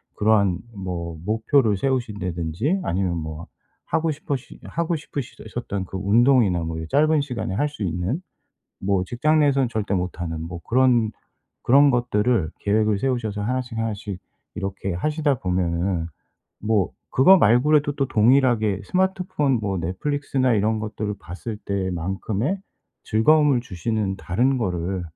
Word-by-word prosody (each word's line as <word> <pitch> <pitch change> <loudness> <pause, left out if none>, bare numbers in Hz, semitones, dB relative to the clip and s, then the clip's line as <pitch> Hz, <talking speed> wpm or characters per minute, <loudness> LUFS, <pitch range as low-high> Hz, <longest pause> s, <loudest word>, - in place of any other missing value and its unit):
그러한 100 -4 +3 0.2
뭐 85 -4 -5
목표를 110 +1 +2
세우신다든지, 105 - -1
아니면 90 0 0
뭐 80 0 -6 0.4
하고 160 0 0
싶으시 140 -3 -5
하고 170 0 -1
싶으시 145 -4 -6 0.2
셨던 100 -5 -3
그 95 - -9
운동이나 105 -2 +3
뭐 80 0 -4
이 80 - -6
짧은 155 +1 +3
시간에 125 -8 -4
할 145 +7 +1
수 145 -7 -6
있는 90 - -2 0.6
뭐 95 -1 0
직장 140 +10 +1
내에서는 135 -4 +2
절대 110 -4 -1
못하는 90 -3 -3
뭐 85 +1 -6
그런 120 -3 +3 0.5
그런 140 +3 +6
것들을 120 - +1
계획을 105 0 +2
세우셔서 110 -4 -1
하나씩 125 +1 -2
하나씩 105 -4 -3 0.4
이렇게 95 -1 -4
하시다 145 - 0
보면은 90 -1 -1 0.5
뭐 105 -3 +1 0.2
그거 185 +9 +6
말고라도 145 +5 +4
또 135 - +1
동일하게 110 -3 +3
스마트폰 185 - 0
뭐 100 -3 -2
넷플릭스나 130 - -1
이런 110 +1 +1
것들을 105 -1 -4
봤을 105 +5 -7
때만큼의 95 - -2 0.5
즐거움을 145 +4 +4
주시는 100 0 -2
다른 125 +9 +1
거를 90 -3 -2
110 Hz, 310 characters per minute, -23 LUFS, 95-135 Hz, 0.6 s, 그런